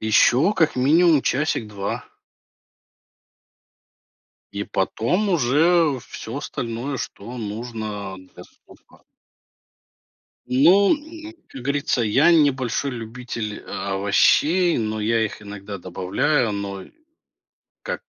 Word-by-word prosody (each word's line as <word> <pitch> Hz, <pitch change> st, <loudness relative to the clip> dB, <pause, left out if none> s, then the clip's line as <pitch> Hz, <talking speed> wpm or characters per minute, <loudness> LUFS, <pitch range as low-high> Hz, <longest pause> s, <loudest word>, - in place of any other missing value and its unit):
Еще 120 Hz, -, +4 dB
как 160 Hz, -6 st, +2 dB
минимум 155 Hz, +3 st, +4 dB
часик-два. 110 Hz, -8 st, -2 dB, 2.5 s
И 100 Hz, 0 st, -3 dB
потом 115 Hz, -, -1 dB
уже 160 Hz, -1 st, +3 dB
всё 115 Hz, +4 st, -7 dB
остальное, 125 Hz, 0 st, -4 dB
что 115 Hz, +4 st, -7 dB
нужно 110 Hz, -3 st, -5 dB
для 95 Hz, 0 st, -14 dB
супа. -, -, -22 dB, 1.5 s
Ну, 180 Hz, -, +5 dB
м, 320 Hz, +2 st, -11 dB, 0.2 s
как 130 Hz, -, -10 dB
говорится, 140 Hz, -2 st, 0 dB
я 135 Hz, +10 st, +4 dB
не 150 Hz, -4 st, +5 dB
большой 130 Hz, +1 st, -2 dB
любитель 115 Hz, -2 st, -6 dB
овощей, 145 Hz, -, +2 dB
но 110 Hz, -1 st, -2 dB
я 110 Hz, +1 st, +1 dB
их 105 Hz, 0 st, -6 dB
иногда 100 Hz, 0 st, -8 dB
добавляю, 95 Hz, -, 0 dB
но 100 Hz, -1 st, -5 dB, 1.0 s
как, -, -, -4 dB
120 Hz, 95 wpm, -22 LUFS, 105-155 Hz, 2.5 s, Ну